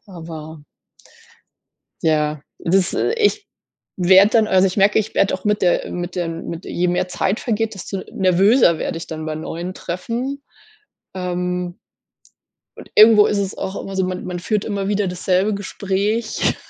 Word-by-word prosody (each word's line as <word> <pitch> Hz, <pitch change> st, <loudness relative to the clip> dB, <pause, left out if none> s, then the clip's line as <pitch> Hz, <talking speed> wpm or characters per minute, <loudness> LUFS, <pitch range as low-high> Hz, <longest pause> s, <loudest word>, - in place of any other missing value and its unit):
aber 160 Hz, -4 st, -9 dB, 1.4 s
ja, 150 Hz, -2 st, +1 dB, 0.2 s
das 185 Hz, +1 st, +1 dB
äh, -, -, 0 dB
ich 415 Hz, -2 st, +1 dB, 0.5 s
werde 190 Hz, +3 st, +6 dB
dann 220 Hz, -2 st, +3 dB
also, 190 Hz, -1 st, +4 dB
ich 185 Hz, -, -5 dB
merke, 200 Hz, +1 st, +4 dB
ich 220 Hz, 0 st, -4 dB
werde 195 Hz, -, +2 dB
auch 185 Hz, -, -5 dB
mit 210 Hz, 0 st, +1 dB
der 175 Hz, -1 st, +2 dB
äh, -, -, -7 dB
mit 175 Hz, +1 st, -5 dB
den 165 Hz, -2 st, -4 dB
mit 170 Hz, +1 st, -7 dB
je 180 Hz, +1 st, -1 dB
mehr 180 Hz, +1 st, 0 dB
Zeit 190 Hz, +3 st, -1 dB
vergeht, 225 Hz, -2 st, -1 dB
desto 195 Hz, 0 st, -6 dB
nervöser 190 Hz, 0 st, +4 dB
werde -, -, -3 dB
ich 165 Hz, -, -8 dB
dann 155 Hz, -1 st, -6 dB
bei 155 Hz, -1 st, -3 dB
neuen 170 Hz, +3 st, -5 dB
Treffen. 235 Hz, +12 st, -4 dB, 0.7 s
Ähm 180 Hz, -1 st, -3 dB, 1.0 s
und -, -, -12 dB
irgendwo 215 Hz, -1 st, +8 dB
ist 205 Hz, -, 0 dB
es 195 Hz, -1 st, -2 dB
auch 190 Hz, -, -4 dB
immer 195 Hz, -, -7 dB
so: 190 Hz, -, +1 dB
Man 185 Hz, 0 st, -4 dB
man 180 Hz, -1 st, -4 dB
führt 210 Hz, +3 st, -1 dB
immer 200 Hz, -2 st, -2 dB
wieder 205 Hz, -1 st, 0 dB
dasselbe 185 Hz, +3 st, 0 dB
Gespräch. 200 Hz, +3 st, -1 dB
190 Hz, 165 wpm, -20 LUFS, 175-205 Hz, 1.4 s, irgendwo